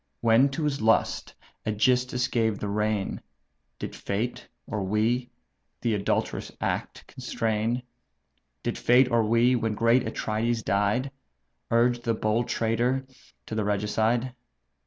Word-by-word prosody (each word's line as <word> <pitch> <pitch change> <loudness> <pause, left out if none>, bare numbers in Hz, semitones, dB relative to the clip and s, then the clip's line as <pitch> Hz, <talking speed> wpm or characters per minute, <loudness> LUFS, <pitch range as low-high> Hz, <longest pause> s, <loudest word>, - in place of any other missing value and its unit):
When 115 +4 +5
to 145 +4 -3
his 145 -4 -1
lust 110 +1 +1 0.3
AEgysthus 125 +4 +1
gave 110 -3 +1
the 105 - -4
rein, 105 -1 -1 0.6
Did - - -6
fate, 110 +5 -3 0.2
or 110 -3 -3
we, 115 +5 0 0.5
the 115 -2 +1
adulterous 100 -1 -1
act - - -3
constrain? 115 +2 -2 0.8
Did - - -2
fate, 125 +1 +4
or 115 -1 +4
we, 115 +3 +3
when 115 -3 -1
great 115 +3 +3
Atrides 110 +1 -1
died, 105 +7 +1 0.6
Urge 120 +1 +3
the 115 -1 0
bold 110 +2 0
traitor 120 +4 0 0.4
to - - -7
the 110 -1 0
regicide? 110 +4 0
115 Hz, 125 wpm, -27 LUFS, 110-125 Hz, 0.8 s, When